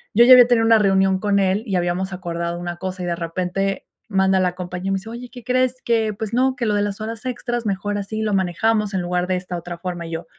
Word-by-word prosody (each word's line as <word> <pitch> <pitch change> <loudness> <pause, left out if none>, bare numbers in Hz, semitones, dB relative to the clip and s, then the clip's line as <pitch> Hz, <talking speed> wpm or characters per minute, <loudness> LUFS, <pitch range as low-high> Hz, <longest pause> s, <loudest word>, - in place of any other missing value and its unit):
yo, 235 +3 +7
ya 255 - +6
había 245 -1 +9
tenido 230 -2 +3
una 225 -1 +5
reunión 190 -2 +3
con 205 -1 +1
él 195 +1 +2
y 195 - -1
habíamos 180 +2 -1
acordado 170 -2 -4
una 175 0 -5
cosa, 185 0 -5
y - - -3
de 175 -1 -1
repente, 180 +3 -2 0.2
manda 190 -2 +2
la 180 -1 0
compañe 180 +1 -5
y - - 0
me 195 - +1
dice: 215 +4 -9
"Oye, 240 +1 -8
¿qué 245 -2 -11
crees?, 255 0 0
que, 225 -2 +1
pues 215 +2 -6
no, 260 +1 +2
que 245 -2 -2
lo 210 - +1
de 205 - +1
las 205 0 -2
horas 225 +2 -6
extras 240 -1 -3
mejor 205 +1 -2
así 215 +2 -4
lo 210 -2 -1
manejamos 200 +3 +1
en 185 - 0
lugar 180 0 -1
de 185 - 0
esta 180 0 -5
otra 175 0 -6
forma", 175 -1 -5
y - - -9
yo: 165 +1 -5
195 Hz, 265 wpm, -21 LUFS, 180-225 Hz, 0.2 s, había